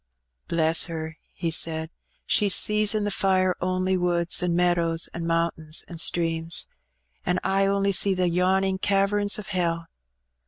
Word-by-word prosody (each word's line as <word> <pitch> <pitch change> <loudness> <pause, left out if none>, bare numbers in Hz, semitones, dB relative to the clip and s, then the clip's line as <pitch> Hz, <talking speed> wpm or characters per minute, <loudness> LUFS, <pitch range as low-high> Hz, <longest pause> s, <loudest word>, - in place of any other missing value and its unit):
"Bless 165 -1 +2
her!" 160 -1 -7
he 170 -2 -3
said. 160 0 0 0.3
"She 205 - +2
sees 210 +2 +3
in 215 - 0
the 205 - -1
fire 185 -2 +1
only 185 +1 0
woods, 175 -1 0
an' 175 -1 0
meadows, 170 -2 +1
an' 170 -1 -5
mount^/ins, 165 -2 -1
an' 170 -2 -9
streams; 165 0 +1 0.6
an' 180 - 0
I 195 0 +1
only 200 0 +1
see 195 0 +2
the 180 -1 +1
yawning 190 +2 +1
caverns 205 +1 +1
o' 210 - -6
hell. 170 -3 -2
180 Hz, 150 wpm, -24 LUFS, 165-195 Hz, 0.6 s, sees